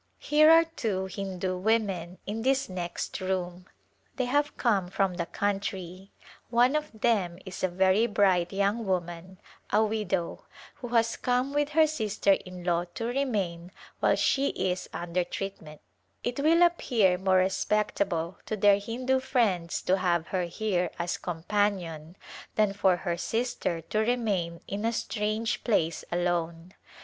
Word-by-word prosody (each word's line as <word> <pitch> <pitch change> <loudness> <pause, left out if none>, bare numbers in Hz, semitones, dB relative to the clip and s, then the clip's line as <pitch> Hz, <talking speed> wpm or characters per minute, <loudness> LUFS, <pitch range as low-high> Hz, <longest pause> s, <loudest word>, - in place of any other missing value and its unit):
Here 305 +1 +4
are 330 +1 +8
two 220 - -3
Hindu 190 -1 -4
women 190 -4 0
in 215 +2 -3
this 270 +2 +1
next 180 +1 -4
room. 180 -1 -3 0.5
They 255 - 0
have 290 +4 0
come 205 -7 +1
from 195 0 0
the 170 -1 -3
country. 195 -2 -3 0.4
One 245 +4 +4
of 300 -8 -4
them 195 -8 +1
is 190 0 -7
a - - +4
very 190 +5 +3
bright 190 -5 +2
young 200 +3 0
woman 180 0 -3 0.2
— - - -24
a 215 +2 +4
widow 200 -5 -2 0.2
— - - -19
who 245 - -7
has 230 -1 +2
come 250 +2 0
with 290 0 +1
her 320 - +8
sister 215 -9 0
in 185 -2 -2
law 175 -1 +1
to 230 - -3
remain 205 -10 -2 0.3
while - - +3
she 275 0 +2
is 185 0 -2
under 175 +1 -2
treatment; 175 -5 -7 0.4
it 245 +2 -2
will 325 +4 +5
appear 230 - +3
more 190 0 +3
respectable 190 -2 0
to 215 - -2
their 205 0 +5
Hindu 250 +5 -1
friends 220 -10 0
to 185 - +2
have 175 -3 0
her 185 -2 0
here 180 -1 -1
as 170 0 -2
companion 175 -2 -2 0.4
than 210 -2 +2
for 190 -2 +3
her 175 -1 -3
sister 225 -5 -2
to 215 +6 -2
remain 210 -8 0
in 200 +2 -4
a 230 +1 +1
strange 215 +1 -2
place 165 -8 +1
alone. 175 0 -1
195 Hz, 155 wpm, -28 LUFS, 180-230 Hz, 0.5 s, are